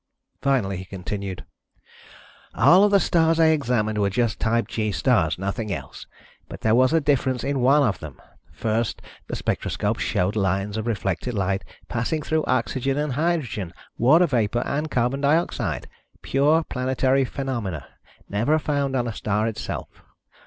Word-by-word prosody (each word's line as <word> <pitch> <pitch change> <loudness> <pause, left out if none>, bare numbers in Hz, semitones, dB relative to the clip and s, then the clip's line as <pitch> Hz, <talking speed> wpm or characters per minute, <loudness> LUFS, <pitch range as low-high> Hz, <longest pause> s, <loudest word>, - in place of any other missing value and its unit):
Finally, 120 -9 +1
he 95 - -7
continued: 95 0 -6 1.1
"All 185 +4 +6
of 205 - +5
the 200 -1 +5
stars 165 -2 +2
I 160 -1 +6
examined 120 -8 +1
were 100 -1 +2
just 115 +2 0
type 115 +1 +1
G 110 -2 -2
stars, 90 - +2
nothing 100 +3 -3
else, 70 -8 -7 0.4
but - - -9
there 110 - +2
was 130 +3 +4
a 165 - +4
difference 135 -4 0
in 140 -1 -1
one 140 +4 +4
of 110 -7 0
them. 75 -4 -9 0.3
First, 115 0 -1 0.3
the - - -4
spectroscope - - -2
showed 90 +4 0
lines 100 0 0
of 110 +1 -3
reflected 100 +1 -2
light 95 0 0 0.2
passing 125 +6 -2
through 155 +1 0
oxygen 130 +1 0
and 150 -2 -1
hydrogen, 140 - -1 0.2
water 155 +9 +5
vapor 120 -4 0
and 150 +2 -2
carbon 125 +2 0
dioxide. 155 +4 0 0.4
Pure 150 +4 +3
planetary 130 0 +1
phenomena, 120 - -4 0.4
never 115 +10 +1
found 140 -3 -1
on 120 -2 0
a 115 - -3
star 105 +1 -1
itself. 115 -1 -5
125 Hz, 150 wpm, -24 LUFS, 105-140 Hz, 1.1 s, All